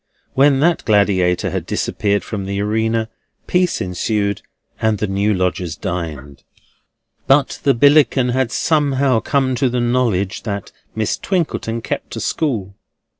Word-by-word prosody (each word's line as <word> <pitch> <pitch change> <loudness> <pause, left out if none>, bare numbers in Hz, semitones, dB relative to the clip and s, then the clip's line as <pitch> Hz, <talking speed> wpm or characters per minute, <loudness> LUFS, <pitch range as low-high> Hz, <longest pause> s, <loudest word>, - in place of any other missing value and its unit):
When 135 0 +4
that 170 +2 +2
gladiator 95 -4 +2
had - - -4
disappeared 100 -1 -1
from 100 -3 -5
the 100 0 -3
arena, 110 +2 0 0.4
peace 180 -1 +1
ensued, 100 +3 -1 0.4
and 110 -1 +2
the 105 - -1
new 100 +1 0
lodgers 90 -3 -1
dined. 75 -5 -5 0.8
But 135 0 +3
the 140 - +3
Billickin 140 -1 +4
had 130 -2 0
somehow 140 -5 +2
come 135 +1 0
to 125 +1 +1
the 125 0 -1
knowledge 120 -5 0
that 100 -3 -5 0.2
Miss 110 -1 -1
Twinkleton 145 - -2
kept - - -4
a - - -4
school. 110 -11 -2
110 Hz, 135 wpm, -18 LUFS, 100-135 Hz, 0.8 s, When